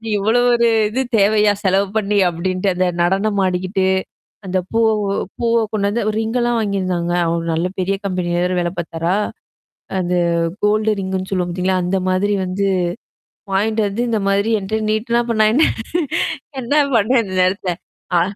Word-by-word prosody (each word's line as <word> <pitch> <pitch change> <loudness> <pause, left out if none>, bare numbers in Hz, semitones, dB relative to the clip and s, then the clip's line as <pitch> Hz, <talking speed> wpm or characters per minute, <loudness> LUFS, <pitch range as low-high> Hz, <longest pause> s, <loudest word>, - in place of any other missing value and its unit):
இவ்ளோ 215 +4 +2
ஒரு 235 0 +3 0.2
இது 250 +5 -1 0.2
தேவையா? 210 +1 +4
செலவு 195 +1 +3
பண்ணி 210 -1 0
அப்டின்ட்டு 185 +3 -1
அந்த 185 +1 +1
நடனம் 195 +4 +1
ஆடிக்கிட்டு. 185 +1 -1 0.6
அந்த 185 0 0
பூவ 225 -1 +3 0.5
பூவ 235 -1 +1 0.2
கொண்டு 200 -2 0
வந்து 235 +3 -1 0.2
ரிங்கலாம் 240 +1 0
வாங்கியிருந்தாங்க. 185 -4 -1
அவரு 165 0 -1
நல்ல 165 +2 0
பெரிய 195 +2 0
கம்பெனி 180 -2 -2
வேற 180 +1 0
வேல 175 0 -1
பார்த்தாரா? 170 +2 -1 0.8
அந்த 180 0 -1 0.5
கோல்ட 215 +1 +2
ரிங்ன்னு 190 0 -3
சொல்லுவோம் 180 -2 0
பார்த்தீங்களா, 185 +1 0
அந்த 190 +2 0
மாதிரி 200 +3 +1
வந்து 190 +2 -1 0.9
வாயின்ட்டு 215 +2 +1
வந்து 205 +4 -2
இந்த 220 -2 0
மாதிரி 200 +3 +1
என்ட்ட 215 +3 -3
நீட்டுனா 235 +2 +1
அப்புறம் 230 -2 0
நா - - +5
என்ன 310 - +5 1.0
என்ன 245 +4 -1 0.2
பண்வேன் 230 +3 +3
அந்த 190 -3 -6
நேரத்துல? 185 0 0 0.5
ஆ - - +3
195 Hz, 150 wpm, -19 LUFS, 185-220 Hz, 1.0 s, நா